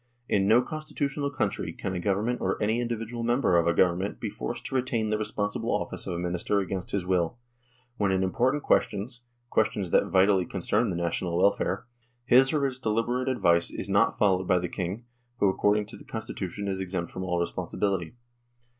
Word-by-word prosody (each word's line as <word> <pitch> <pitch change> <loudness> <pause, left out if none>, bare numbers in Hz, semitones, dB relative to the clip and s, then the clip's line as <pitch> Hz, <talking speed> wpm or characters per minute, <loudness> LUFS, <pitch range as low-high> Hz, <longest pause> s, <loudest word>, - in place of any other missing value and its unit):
In 100 -1 +2
no 115 +4 +5
constitutional 145 -2 -3
country 100 -9 -2
can 95 +2 -4
a 90 - -2
Government 105 +6 0
or - - 0
any 110 +3 +1
individual 115 0 -3
member 120 -5 +2
of 85 0 +3
a 85 - +3
Govern 90 -1 +3
ment 100 +2 -4
be - - -3
forced - - -5
to - - -5
retain 120 -4 0
the 105 - +2
responsible 105 -1 -2
office - - -2
of 85 - -2
a - - -3
Minister 90 +3 0
against 95 -1 -3
his 100 -3 -1
will, 90 +2 0 0.6
when 100 -2 +1
in 95 0 +1
important 125 +10 +1
questions 120 +5 0 0.3
questions 100 -4 +1
that - - +4
vitally 95 0 +3
concern 105 +5 0
the 90 - -2
national 85 0 -1
welfare 100 0 +1 0.4
his 130 +2 +6
or 150 -3 +1
its 130 -2 -3
deliberate 120 +3 0
advice 85 -9 +3
is 95 - -6
not 100 +1 +3
followed 95 -3 +2
by 90 - +4
the 90 0 -1
King, 95 +6 -4 0.3
who 100 - +3
according 105 +2 +2
to 105 - -8
the - - -13
Constitution 100 -3 -5
is 95 -1 -2
exempt 90 -2 -3
from 95 - -5
all 90 -1 -1
responsibility. 90 +2 -2
100 Hz, 190 wpm, -27 LUFS, 90-120 Hz, 0.6 s, his